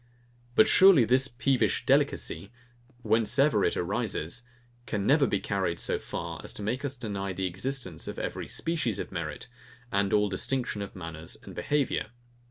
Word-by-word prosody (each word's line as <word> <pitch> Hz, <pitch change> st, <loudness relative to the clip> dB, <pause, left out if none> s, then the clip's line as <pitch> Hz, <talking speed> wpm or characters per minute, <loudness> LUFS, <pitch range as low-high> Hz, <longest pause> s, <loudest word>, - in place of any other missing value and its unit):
But 220 Hz, -, +6 dB
surely 190 Hz, -10 st, +7 dB
this 130 Hz, +4 st, +3 dB
peevish 120 Hz, -3 st, +1 dB
delicacy, 90 Hz, +5 st, +2 dB, 0.5 s
whence 115 Hz, +2 st, +2 dB
ever 135 Hz, -8 st, +4 dB
it -, -, +1 dB
arises 95 Hz, 0 st, -1 dB, 0.5 s
can 100 Hz, -3 st, -2 dB
never 140 Hz, +1 st, +4 dB
be 100 Hz, -, 0 dB
carried 95 Hz, -5 st, -1 dB
so -, -, -1 dB
far -, -, -5 dB
as -, -, -6 dB
to 105 Hz, -, -6 dB
make 120 Hz, +7 st, -2 dB
us 140 Hz, -1 st, -4 dB
deny 100 Hz, -5 st, -3 dB
the 95 Hz, +1 st, -2 dB
existence 95 Hz, -, -3 dB
of -, -, -5 dB
every -, -, -4 dB
species 155 Hz, -, -1 dB
of -, -, -5 dB
merit, 75 Hz, -3 st, -4 dB, 0.4 s
and 100 Hz, 0 st, +1 dB
all 105 Hz, 0 st, +3 dB
distinction 120 Hz, +1 st, -1 dB
of 100 Hz, -, -7 dB
manners 80 Hz, -3 st, -7 dB
and -, -, -10 dB
behaviour. 145 Hz, -6 st, 0 dB
105 Hz, 165 wpm, -28 LUFS, 95-130 Hz, 0.5 s, surely